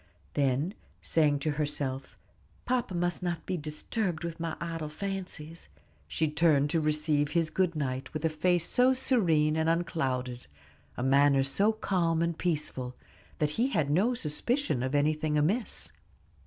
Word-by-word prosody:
Then, 140 +5 +1 0.3
saying 150 -3 +3
to 155 - 0
herself, 145 -2 -3 0.5
"Papa 245 -6 -1
must 175 0 -1
not 175 -2 -3
be 185 - -2
disturbed 165 +3 -3
with 170 -1 -5
my 165 -1 -3
idle 165 -2 -4
fancies," 170 - -6 0.4
she 160 - 0
turned 150 -2 +3
to 165 - +2
receive 150 -1 +1
his 165 -2 +2
good 180 -2 +1
night 130 -3 -3
with 155 +1 -3
a - - +3
face 170 +2 +1
so 255 +1 +4
serene 165 - +2
and 160 0 +1
unclouded, 130 - -1 0.5
a 120 - -2
manner 140 +1 +4
so 195 +11 +3
calm 175 -6 0
and 170 0 -1
peaceful, 150 -7 -1 0.4
that 150 -1 0
he 250 - +4
had 155 - 0
no 210 +11 +2
suspicion 230 - 0
of 130 +3 -1
anything 150 +1 +1
amiss. 195 +11 -1
160 Hz, 150 wpm, -29 LUFS, 145-175 Hz, 0.5 s, so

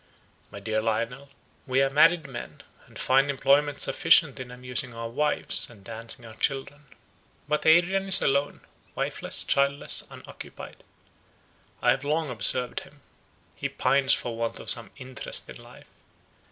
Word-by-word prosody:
My 100 - -10
dear 110 +1 -2
Lionel, 115 +5 -3 0.4
we 130 0 +1
are 135 - 0
married 160 +2 +4
men, 130 -3 -9 0.2
and - - -15
find 135 +2 +2
employment 140 +1 +1
sufficient 160 -4 +4
in 125 -1 -8
amusing 125 0 -1
our 115 0 -5
wives, 150 +4 0
and 105 -5 -17
dancing 115 +2 -8
our 110 - -11
children. 140 +4 -3 0.6
But 150 +1 -1
Adrian 180 +4 +3
is 190 - +8
alone, 140 +1 0 0.3
wifeless, - - -1
childless, 140 +1 +1
unoccupied. - - -12 1.0
I - - +5
have 135 - -1
long 150 0 -1
observed 125 +2 0
him. 140 +1 -17 0.5
He - - -4
pines 135 -1 +2
for 120 -2 -5
want 115 0 -4
of - - +5
some 115 - -2
interest 130 -1 -3
in - - -11
life. - - -16
135 Hz, 145 wpm, -26 LUFS, 120-145 Hz, 1.0 s, is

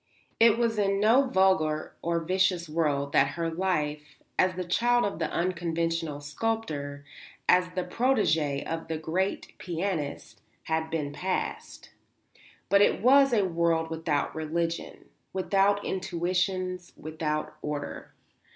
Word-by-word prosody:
It 230 -1 +6
was 230 -2 +1
in 195 -1 +2
no 235 +6 +4
vulgar 190 -7 +2
or 170 0 0
vicious 185 0 +1
world 150 -3 0
that - - +3
her 165 -1 -1
life, 150 -5 -2 0.2
as 185 0 +3
the 185 - -3
child 240 +7 +2
of 200 -5 -3
the 165 - -1
unconventional 165 -3 -1
sculptor, 145 -4 -3 0.4
as 180 0 +4
the 185 - 0
protégée 165 - +1
of 165 0 -4
the 160 -1 -2
great 175 +5 -2
pianist, 170 -4 -4 0.2
had 160 0 -1
been 150 -3 -3
passed. 185 +3 -4 0.8
But 200 0 +4
it - - +4
was 275 +2 +6
a 210 -5 +3
world 165 -2 0
without 160 -3 -1
religion, 165 +2 -3 0.3
without 195 +1 +2
institutions, 185 0 -2
without 155 -1 -3
order. 150 -1 -5
170 Hz, 125 wpm, -28 LUFS, 155-190 Hz, 0.8 s, It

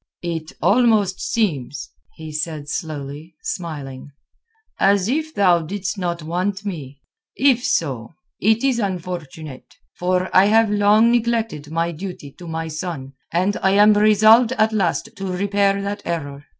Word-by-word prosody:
"It 165 -2 -4
almost 215 -4 +3
seems," 145 - -2 0.2
he 160 -1 -9
said 155 -1 -4
slowly, 150 0 -6
smiling, 145 -6 -6 0.7
"as 195 -1 +3
if 310 +5 -1
thou 180 -4 +4
didst 190 +4 -4
not 170 -3 -3
want 185 +5 -2
me. 145 -8 -6 0.4
If 260 -3 +3
so, 130 - -1 0.2
it 220 +3 +2
is 265 -3 +2
unfortunate; 170 - -6 0.2
for 180 +1 0
I 185 - +7
have 220 +1 +4
long 210 +3 +4
neglected 230 -10 -1
my 165 +2 -1
duty 170 -4 -8
to 175 - -9
my 165 0 -4
son, 155 -4 -6 0.2
and 185 +4 +1
I 190 - +3
am 210 +1 +6
resolved 215 +3 +5
at 220 -2 +1
last 215 +1 0
to 195 - -5
repair 200 +1 +1
that 200 +1 -4
error. 145 -4 -5
185 Hz, 140 wpm, -21 LUFS, 160-210 Hz, 0.7 s, I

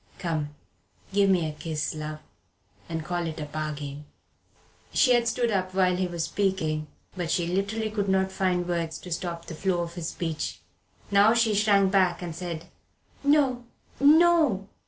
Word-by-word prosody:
Come, 155 -5 -3 0.6
give 200 0 +4
me 175 -4 +3
a 155 - -5
kiss, 155 0 -3
love, 155 0 -6 0.7
and 160 -1 -3
call 175 0 -2
it 160 0 -5
a 150 - -3
bargain." 150 -1 -5 0.9
She 255 -3 +4
had 240 -1 +3
stood 240 -1 +1
up 185 -2 -1
while 185 -1 +3
he 185 0 0
was 170 -2 -3
speaking, 160 -5 -1 0.3
but 175 -3 -3
she 170 0 +1
literally 200 +5 -1
could 205 -2 -1
not 190 0 +2
find 180 -2 0
words 170 -2 -2
to 180 - -10
stop 170 -1 -4
the - - -7
flow 180 +1 0
of 170 0 -7
his 170 -2 -5
speech. 165 -3 -4 0.5
Now 205 +3 +6
she 230 -2 +3
shrank 200 -2 +4
back 185 -2 +2
and 170 -2 -5
said, 170 -2 -5 0.6
"No 280 -4 +3 0.4
no!" 300 - +5
180 Hz, 165 wpm, -27 LUFS, 165-200 Hz, 0.9 s, Now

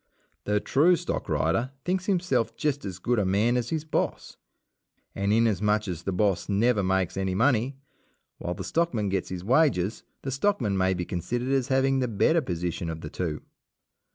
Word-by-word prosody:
The 105 0 +2
true 155 - +4
stockrider 95 - -1
thinks 185 +1 -1
himself 180 - +1
just 145 -4 -1
as 95 -3 -5
good 120 +5 0
a - - +2
man 105 +6 +2
as 120 -1 -1
his 160 -1 -2
boss, 155 - -2 0.8
and 100 +1 -1
inasmuch 105 -1 +2
as 85 -3 -4
"the 95 - -3
boss" 95 -1 0
never 105 +2 +2
makes 95 -1 0
any 95 -1 -1
money, 125 +3 +2 0.6
while 90 - -3
the - - -6
stockman 125 -12 0
gets 95 -1 -2
his 90 -1 -5
wages, 115 - +2 0.2
the 135 - -3
stockman 135 - +1
may 95 0 +2
be 90 0 -3
considered 120 +9 -3
as 135 -2 +1
having 135 0 +2
the 125 - +1
better 160 +9 +2
position 85 - -3
of 80 0 -5
the 75 - -7
two. 80 -4 -3
105 Hz, 175 wpm, -27 LUFS, 95-135 Hz, 0.8 s, true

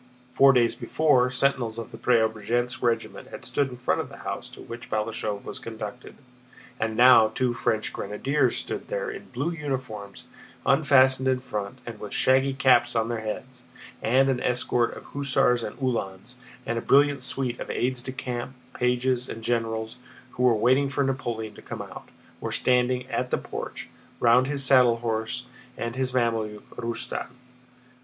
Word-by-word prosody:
Four 135 +1 +7
days 120 -3 +3
before, 140 -5 +2
sentinels 125 -3 +1
of 115 - -6
the - - -9
Preobrazhénsk 120 +2 +1
regiment 120 -2 -1
had - - -9
stood 140 -2 0
in 125 - -9
front 125 - 0
of - - -8
the - - -11
house - - -4
to - - -14
which 120 0 -9
Balashëv 105 -1 -2
was - - -6
conducted, 110 +1 -7 0.6
and 110 0 -1
now 120 -3 +8
two 120 +3 -1
French 110 -2 -1
grenadiers 135 +8 0
stood - - -4
there - - -2
in 430 - -8
blue 140 +6 -2
uniforms 130 -10 -5 0.4
unfastened 130 -1 +4
in 130 -1 +2
front 105 -2 -5
and 115 -3 -7
with 105 - -7
shaggy 135 +1 +3
caps 120 -3 +4
on 115 0 +1
their 120 -1 -2
heads, 125 +4 -6 0.4
and 130 +4 +3
an 130 -2 +1
escort 125 -1 0
of - - -10
hussars 135 -3 +1
and 105 - -6
Uhlans 115 -8 -3 0.3
and 115 0 -1
a - - -5
brilliant 140 +1 +4
suite 125 -1 -2
of - - -6
aides 125 0 -1
de 130 - -4
camp, 125 0 -5 0.2
pages, 125 0 0
and 115 - -7
generals, 110 -1 -1 0.3
who - - -6
were 125 -2 +5
waiting 130 +5 +3
for 140 +1 0
Napoleon 120 -5 -3
to - - -13
come - - -6
out, - - -11 0.3
were - - -4
standing 125 0 +2
at 125 - -1
the - - +1
porch, - - -6 0.3
round 120 +2 +5
his 140 -1 -2
saddle 125 -3 +5
horse 115 +2 -2 0.3
and 115 +1 -3
his 130 -1 0
Mameluke, 115 -4 -1
Rustan. 115 0 -3
125 Hz, 170 wpm, -26 LUFS, 115-130 Hz, 0.6 s, now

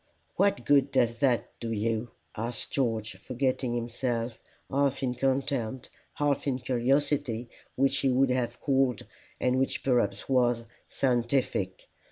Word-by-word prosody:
"What 200 0 +2
good 140 -1 +4
does 120 -3 +2
that 130 -4 +2
do 115 -1 -4
you?" 115 +2 -1 0.3
asked 115 +2 -3
George, 115 -6 -1
forgetting 125 +2 -1
himself, 120 0 -2 0.3
half 140 0 +1
in 125 -2 +1
contempt, 130 -2 -1 0.2
half 145 -1 0
in 135 - +2
a - - -4
curiosity 130 -1 0 0.3
which 135 +1 +2
he 135 - +2
would 130 +1 +3
have 120 -1 -1
called, 135 -4 +1 0.3
and 125 +1 +2
which 135 - -1
perhaps 120 -6 +1
was, 120 -3 +2 0.2
scientific. 120 -6 0
125 Hz, 135 wpm, -29 LUFS, 115-135 Hz, 0.3 s, good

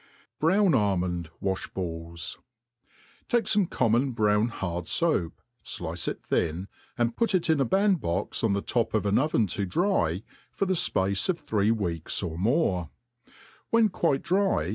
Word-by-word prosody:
Brown 190 +4 +4
Jbmnd 90 - 0
Wajh^BaUi. 85 -4 -4 0.9
TAtCE 235 -4 +2
fome 200 -4 +2
common 120 +3 +2
brown 105 0 +2
hard 90 -7 -4
foap, 155 - +1 0.3
flice - - -5
it - - -4
thin, 85 +4 -1 0.3
and 120 -1 0
put 230 -4 +1
it 170 -2 +2
into 150 -3 +2
a - - +3
band 195 - +3
box 85 +6 -2
on 110 -3 +3
the 100 +1 -1
top 115 -2 0
of 105 - +1
an 100 0 +3
oven 135 -6 +2
to 100 +1 -3
dry, 100 - 0 0.3
for 195 - -1
the 190 - +1
fpace 100 - +1
of 180 - +2
three 105 -1 0
weeks, 90 -7 -1
of 85 -2 -4
more; 95 - +1 0.8
when 230 -2 +4
quite 155 -7 0
dry 190 - +1
110 Hz, 155 wpm, -27 LUFS, -, 0.9 s, Brown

